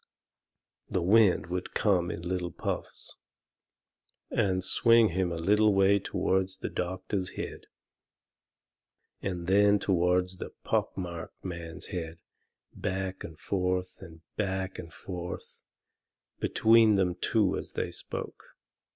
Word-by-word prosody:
The 90 - 0
wind 100 +1 +5
would 90 0 -4
come 90 -5 +2
in 85 - -5
little 90 0 -2
puffs, - - -5 1.1
and 95 -2 +1
swing 115 +3 +5
him 90 0 0
a - - -2
little 105 +5 +3
way 100 +1 +5
toward 95 -1 0
the - - -4
doctor's 95 +1 -3
head, - - -6 1.5
and 90 -3 -3
then 100 +2 +5
toward 90 -2 +2
the - - -6
pock - - 0
marked 85 -1 -6
man's 85 -3 -6
head, 85 -2 -4 0.6
back 95 0 -3
and 80 - -9
forth 90 0 -1
and 80 -1 -12 0.2
back 95 -2 -2
and 85 - -8
forth, 90 0 -7 0.7
between 110 -1 +5
them 95 -2 +2
two 95 +2 +1
as - - -6
they - - -2
spoke. - - -7
95 Hz, 120 wpm, -29 LUFS, 90-100 Hz, 1.5 s, wind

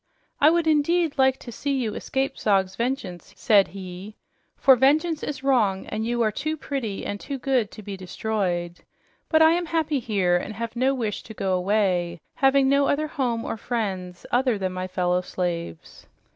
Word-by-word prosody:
"I 295 - +7
would 340 0 +2
indeed 315 0 +2
like 265 0 +4
to 240 - -10
see 280 +4 -2
you 240 -6 -1
escape 270 +4 -2
Zog's 195 -2 +1
vengeance," 230 - -4
said 205 -4 +4
he, 190 +2 -9 0.4
"for 265 - +6
vengeance 305 +5 +2
is 280 -2 -5
wrong, 220 -8 +2
and 215 +1 -4
you 240 +1 0
are 215 - +2
too 310 +8 -3
pretty 255 -9 -4
and 205 - -4
too 280 +5 -5
good 255 -5 0
to 215 - -11
be 200 0 -6
destroyed. 185 -2 -3 0.5
But 320 -1 +5
I 320 - +7
am 345 0 0
happy 315 -3 0
here 195 -7 +1
and 205 +4 -5
have 230 +2 -5
no 260 +3 +2
wish 220 -5 -3
to 220 - -11
go 190 -2 -1
away, 180 -2 +1
having 270 0 +3
no 280 +1 +3
other 305 +1 0
home 245 -7 -1
or - - -3
friends 190 -7 -4
other 250 -2 +2
than 190 -2 -2
my 185 0 -4
fellow 180 -1 0
slaves." 170 - -5
225 Hz, 185 wpm, -24 LUFS, 190-275 Hz, 0.5 s, I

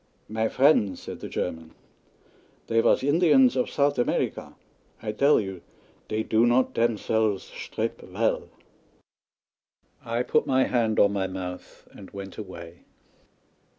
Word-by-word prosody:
"My 110 +1 -1
friend," 130 -8 +3
said - - -8
the - - -7
German, 80 0 -5 0.9
"dey 115 - +1
vas - - +3
Indians 175 - +4
of 250 - 0
Sout' 140 -2 +1
America. 120 - -1 0.4
I 110 -2 -4
dell 140 +7 +4
you 95 -4 -5 0.5
dey 110 +1 -2
do 110 +2 +2
not 125 +2 +2
demselves 110 -3 0
shtrip - - -4
vell." - - -2 1.5
I 115 +1 -1
put - - +1
my 130 0 +3
hand 115 -3 +1
on 100 0 +4
my 95 -1 -1
mouth 90 -1 -8
and 95 - -12
went 100 0 -9
away. 85 -4 -9
110 Hz, 130 wpm, -26 LUFS, 95-130 Hz, 1.5 s, Indians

